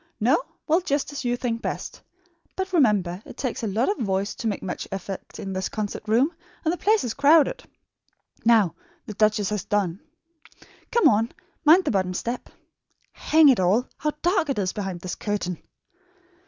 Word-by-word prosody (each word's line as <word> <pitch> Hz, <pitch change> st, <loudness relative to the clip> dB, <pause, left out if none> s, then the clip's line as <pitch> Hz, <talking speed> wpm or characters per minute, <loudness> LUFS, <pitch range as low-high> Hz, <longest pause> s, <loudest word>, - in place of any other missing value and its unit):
No? -, -, +3 dB, 0.2 s
Well, 330 Hz, +3 st, +3 dB
just 285 Hz, -5 st, -1 dB
as 285 Hz, -, -5 dB
you 245 Hz, 0 st, 0 dB
think 235 Hz, -2 st, -2 dB
best. -, -, -5 dB, 0.5 s
But 380 Hz, 0 st, -4 dB
remember, 205 Hz, -, +2 dB
it -, -, -12 dB
takes 255 Hz, -4 st, -3 dB
a 225 Hz, -, -2 dB
lot 215 Hz, +5 st, 0 dB
of 405 Hz, -, 0 dB
voice 195 Hz, 0 st, -1 dB
to 230 Hz, -, -4 dB
make 205 Hz, -, -2 dB
much 185 Hz, -, -4 dB
effect 195 Hz, 0 st, -6 dB
in 195 Hz, -, -5 dB
this 190 Hz, 0 st, -2 dB
concert 210 Hz, -2 st, -4 dB
room, 250 Hz, +10 st, +3 dB, 0.3 s
and 320 Hz, -, +2 dB
the -, -, -3 dB
place 430 Hz, +1 st, +3 dB
is 235 Hz, -, -2 dB
crowded. 290 Hz, +2 st, +4 dB, 0.8 s
Now 225 Hz, -6 st, +4 dB, 0.3 s
the 215 Hz, -, -7 dB
duchess 210 Hz, -1 st, +2 dB
has 210 Hz, -4 st, -2 dB
done. 195 Hz, -4 st, -1 dB, 0.9 s
Come 470 Hz, -, +5 dB
on. 225 Hz, +2 st, +3 dB, 0.3 s
Mind 345 Hz, +5 st, +7 dB
the -, -, +1 dB
bottom 185 Hz, -3 st, 0 dB
step. 235 Hz, +6 st, -4 dB, 0.6 s
Hang 315 Hz, -1 st, +4 dB
it 255 Hz, -, +4 dB
all! 200 Hz, +8 st, +2 dB
How 300 Hz, -1 st, -1 dB
dark 350 Hz, -3 st, +2 dB
it 275 Hz, -, -1 dB
is 190 Hz, -2 st, -1 dB
behind 190 Hz, -4 st, -4 dB
this 180 Hz, 0 st, -4 dB
curtain!" 200 Hz, -5 st, -3 dB
220 Hz, 180 wpm, -24 LUFS, 195-285 Hz, 0.9 s, Mind